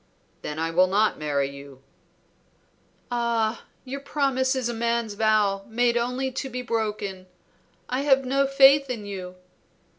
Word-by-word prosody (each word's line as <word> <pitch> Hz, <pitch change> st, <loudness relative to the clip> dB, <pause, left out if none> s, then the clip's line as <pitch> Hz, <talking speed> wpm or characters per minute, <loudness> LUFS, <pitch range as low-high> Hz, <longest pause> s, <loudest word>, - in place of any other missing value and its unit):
"Then 150 Hz, -, -5 dB
I 165 Hz, +1 st, -1 dB
will 180 Hz, +3 st, +4 dB
not 210 Hz, +3 st, +1 dB
marry 145 Hz, -2 st, 0 dB
you." 140 Hz, -1 st, -12 dB, 1.3 s
"Ah, 235 Hz, -2 st, -1 dB, 0.2 s
your 270 Hz, +2 st, -5 dB
promise 275 Hz, -2 st, 0 dB
is 255 Hz, -2 st, -1 dB
a 240 Hz, -, -2 dB
man's 235 Hz, -1 st, -1 dB
vow, 205 Hz, -2 st, +2 dB
made 240 Hz, +1 st, +1 dB
only 250 Hz, +2 st, -1 dB
to 265 Hz, +1 st, -4 dB
be 250 Hz, 0 st, -5 dB
broken. 210 Hz, -5 st, -3 dB, 0.6 s
I 255 Hz, +2 st, -1 dB
have 270 Hz, -2 st, +3 dB
no 275 Hz, +2 st, +2 dB
faith 275 Hz, 0 st, +6 dB
in 230 Hz, -5 st, -4 dB
you." 185 Hz, -2 st, -7 dB
235 Hz, 145 wpm, -25 LUFS, 195-260 Hz, 1.3 s, faith